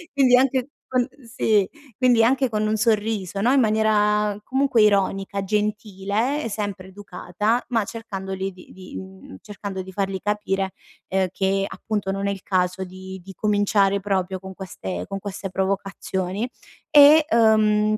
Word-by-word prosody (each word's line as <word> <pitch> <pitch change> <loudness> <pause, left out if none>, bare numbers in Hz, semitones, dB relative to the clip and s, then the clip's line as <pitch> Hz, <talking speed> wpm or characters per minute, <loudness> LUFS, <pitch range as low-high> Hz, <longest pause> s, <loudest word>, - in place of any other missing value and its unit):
quindi 255 -3 +5
anche 260 0 +1 0.2
con 250 0 +2 0.3
sì, 210 -3 +3 0.3
quindi 245 -3 +4
anche 260 +2 +3
con 215 -1 0
un 215 - +1
sorriso, 210 -3 0
no, 245 +6 +3
in 275 - +5
maniera 210 -2 +2
comunque 265 -3 +2
ironica, 200 -1 +2
gentile, 210 +5 -1
e 230 - -3
sempre 200 -3 -4
educata, 205 +3 -2
ma 225 -4 +1
cercandoli 195 -4 -5
di 180 0 -16
di, 185 - -11
mhmm, 95 0 -11
cercando 200 -2 -6
di 190 - -10
fargli 195 -1 -2
capire, 195 -2 -1 0.4
uhm, 190 0 +1
che 195 0 0
appunto 205 -2 -3
non 195 +1 -2
è - - +1
il 195 -2 -7
caso 185 0 0
di 190 0 -9
di 195 - -10
cominciare 200 0 +2
proprio 190 -1 -1
con 190 0 -9
queste 95 - -6
con 195 - -5
queste 195 -1 -6
provocazioni 190 +1 -2 0.4
e, 300 0 +8
ehm, 215 -2 +4
205 Hz, 150 wpm, -23 LUFS, 190-220 Hz, 0.4 s, e